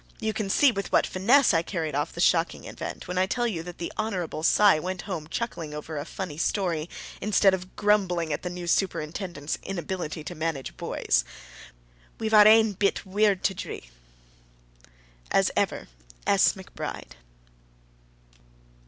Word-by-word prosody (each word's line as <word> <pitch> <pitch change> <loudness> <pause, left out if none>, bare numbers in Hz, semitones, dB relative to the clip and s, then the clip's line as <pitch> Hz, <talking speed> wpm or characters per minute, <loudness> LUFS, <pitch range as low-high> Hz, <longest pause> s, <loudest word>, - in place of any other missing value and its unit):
You 220 0 -1
can 215 -2 -3
see 275 +7 +5
with 200 -4 -4
what - - +4
finesse 230 +7 +4
I 165 - +3
carried 165 -3 -3
off 145 +1 -1
the - - -10
shocking 170 -1 +2
event, - - -7
when 180 +1 -2
I 185 - +2
tell 240 +4 0
you 195 -9 -2
that 175 +1 -9
the 170 - -5
Hon. 190 -8 -2
Cy 195 +1 +5
went 185 +2 -4
home 175 -7 -5
chuckling 165 -10 -4
over 155 +1 -6
a 145 0 -4
funny 165 -4 -6
story, 170 -4 -1 0.3
instead 200 -2 +4
of 185 0 -5
grumbling 185 -6 +1
at - - -3
the 180 - -4
new 175 0 -6
superintendent's 170 -3 -2
inability 175 -3 -4
to 175 - -6
manage 160 -5 -3
boys. - - 0 0.9
We've 220 0 -3
our 210 -1 +9
ain 220 -1 +6
bit 200 +2 0
weird 200 0 +2
to 195 - +2
dree! - - -7 1.4
As - - +3
ever, - - -1 0.4
S. - - +4
McBRIDE. - - -7
185 Hz, 155 wpm, -26 LUFS, 165-205 Hz, 1.4 s, our